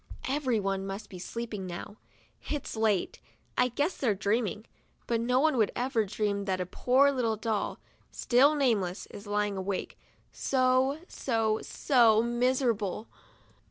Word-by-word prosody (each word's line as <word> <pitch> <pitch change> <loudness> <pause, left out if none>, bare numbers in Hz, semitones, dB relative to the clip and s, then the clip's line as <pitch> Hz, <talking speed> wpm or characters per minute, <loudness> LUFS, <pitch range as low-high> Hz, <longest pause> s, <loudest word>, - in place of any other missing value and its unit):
Everyone 220 -9 0
must 195 +3 -6
be 185 - -8
sleeping 210 0 -5
now, 180 +4 -7 0.5
it's 295 -5 -3
late. 215 -4 0 0.3
I 250 - +3
guess 290 +8 -1
they're 230 -7 +1
dreaming, 210 +1 -1 0.4
but 230 -1 0
no 250 +2 +2
one 305 -1 +3
would 220 -3 +3
ever 245 -3 0
dream 200 0 -2
that 190 -2 -1
a 180 - -1
poor 260 +9 +3
little 240 -5 0
doll, 215 -1 -2 0.3
still 275 +5 +3
nameless, 210 -10 0
is 205 +1 -10
lying 205 0 0
awake, 190 0 -4 0.3
so, 260 +1 +2
so, 225 -3 0
so 230 -5 +3
miserable. 240 -4 0
225 Hz, 135 wpm, -29 LUFS, 205-255 Hz, 0.5 s, I